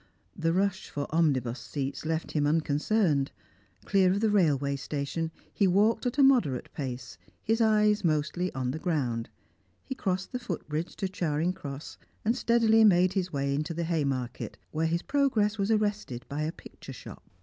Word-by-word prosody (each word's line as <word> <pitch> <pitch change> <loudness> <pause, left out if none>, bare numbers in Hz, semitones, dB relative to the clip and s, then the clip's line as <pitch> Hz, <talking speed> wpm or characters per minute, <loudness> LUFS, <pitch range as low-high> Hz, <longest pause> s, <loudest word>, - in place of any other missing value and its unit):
The 165 -2 0
rush 190 +1 0
for 145 -1 -3
omnibus 135 -7 +1
seats 135 +5 -4
left 160 0 -2
him 145 -2 +1
unconcerned; 150 0 +1 0.5
clear 190 -2 +4
of 195 - +1
the 220 0 +2
railway 145 -8 +2
station, 145 +4 -3 0.2
he 200 - +3
walked 210 +7 +3
at 245 +2 -3
a 280 - +6
moderate 240 - +3
pace, 130 -3 -6 0.2
his 225 +1 +1
eyes 210 -1 +3
mostly 160 +3 0
on 130 -1 -1
the 155 - -4
ground; 130 -10 -1 0.6
he 265 - -4
crossed 190 -6 -2
the 250 - -3
foot 205 -12 -5
bridge 155 +3 -3
to 195 - -2
Charing 170 -2 -1
Cross, 140 -4 -8 0.3
and 230 +3 +2
steadily 230 -2 +4
made 185 -3 +5
his 185 -2 -1
way 140 -1 -1
into 155 +3 -2
the 170 - -1
Haymarket, 140 -7 -2
where 160 +1 0
his 170 +2 -1
progress 225 -7 +1
was 200 +1 0
arrested 210 - 0
by 145 +2 -3
a 155 +1 -1
picture - - -12
shop. - - -11
165 Hz, 170 wpm, -28 LUFS, 145-205 Hz, 0.6 s, a